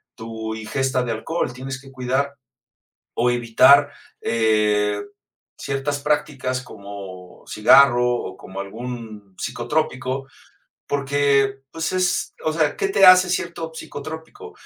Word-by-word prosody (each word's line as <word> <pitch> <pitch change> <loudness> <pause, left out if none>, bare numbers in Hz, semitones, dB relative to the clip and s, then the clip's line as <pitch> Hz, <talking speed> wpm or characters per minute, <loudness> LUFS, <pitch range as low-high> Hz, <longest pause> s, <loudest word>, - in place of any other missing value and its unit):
tu 110 -1 -6
ingesta 130 +3 -1
de 120 - -3
alcohol, 125 +4 -2
tienes 130 +1 -6
que 135 0 -15
cuidar 130 +2 -2 0.8
o 120 +1 +2
evitar, 120 +4 +5 0.3
eh, 105 -2 +1 0.6
ciertas 140 +1 -3
prácticas 135 -3 -1
como 100 -5 -11
cigarro 120 +2 +5
o 120 -6 -3
como 95 +1 -8
algún 110 -1 -8
psicotrópico 130 +1 -2 0.6
porque 140 -1 +1
pues 160 +1 -3
es, 185 0 0
o 155 - +1
sea, 155 -2 +1
¿qué 395 - 0
te 290 - +4
hace 185 0 +8
cierto 170 -3 -3
psicotrópico?, 160 - -8
130 Hz, 115 wpm, -22 LUFS, 110-145 Hz, 0.8 s, hace